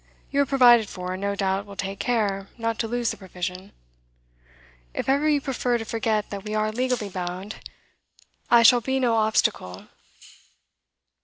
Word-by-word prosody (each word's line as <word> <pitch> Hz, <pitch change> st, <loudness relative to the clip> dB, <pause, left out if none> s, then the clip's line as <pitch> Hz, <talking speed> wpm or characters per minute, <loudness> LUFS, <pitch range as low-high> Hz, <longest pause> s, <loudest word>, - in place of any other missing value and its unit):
You 280 Hz, -, +2 dB
are 280 Hz, -, +1 dB
provided 240 Hz, -5 st, +5 dB
for, 180 Hz, 0 st, -5 dB
and 185 Hz, -, -6 dB
no 200 Hz, 0 st, -1 dB
doubt 195 Hz, 0 st, -1 dB
will 200 Hz, -, -10 dB
take 195 Hz, 0 st, -5 dB
care 200 Hz, -5 st, -1 dB
not 230 Hz, -1 st, -2 dB
to 225 Hz, -, -1 dB
lose 240 Hz, 0 st, -1 dB
the -, -, -7 dB
provision. 185 Hz, 0 st, -6 dB, 1.2 s
If -, -, -3 dB
ever 285 Hz, +3 st, +2 dB
you 295 Hz, -1 st, +3 dB
prefer 250 Hz, -3 st, -1 dB
to 225 Hz, -, -6 dB
forget 220 Hz, -2 st, -1 dB
that 200 Hz, -1 st, -6 dB
we 210 Hz, 0 st, -4 dB
are 215 Hz, 0 st, 0 dB
legally 245 Hz, -2 st, -1 dB
bound, 185 Hz, +2 st, -5 dB, 0.9 s
I 235 Hz, -1 st, +6 dB
shall 240 Hz, +1 st, +7 dB
be 265 Hz, +3 st, -1 dB
no 245 Hz, -3 st, +2 dB
obstacle. 215 Hz, -, 0 dB
215 Hz, 165 wpm, -24 LUFS, 195-240 Hz, 1.2 s, shall